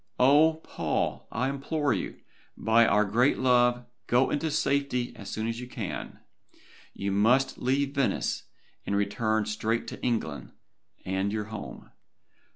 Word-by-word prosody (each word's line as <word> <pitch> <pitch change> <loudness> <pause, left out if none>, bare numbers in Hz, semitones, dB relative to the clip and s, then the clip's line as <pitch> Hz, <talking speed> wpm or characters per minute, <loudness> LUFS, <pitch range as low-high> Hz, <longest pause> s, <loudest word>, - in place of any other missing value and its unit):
Oh! 150 +5 +6
Paul, - - -2
I 125 +4 0
implore 140 0 -1
you, - - -4 0.4
by 115 +1 +4
our 105 +1 +3
great 120 +7 +2
love, 120 -1 +3 0.2
go 125 +2 +3
into 160 +2 0
safety 140 -4 0
as 100 - -9
soon 110 - -3
as 115 +1 -3
you 125 - -7
can. - - -6 0.8
You 100 0 -2
must 120 +7 +3
leave 135 +2 0
Venice, 140 -3 0 0.4
and 100 - -2
return 110 +2 0
straight 110 +2 -1
to - - -9
England, 110 -12 -2 0.5
and 95 +2 -1
your 105 0 -2
home. 100 - -8
120 Hz, 140 wpm, -28 LUFS, 110-135 Hz, 0.8 s, Oh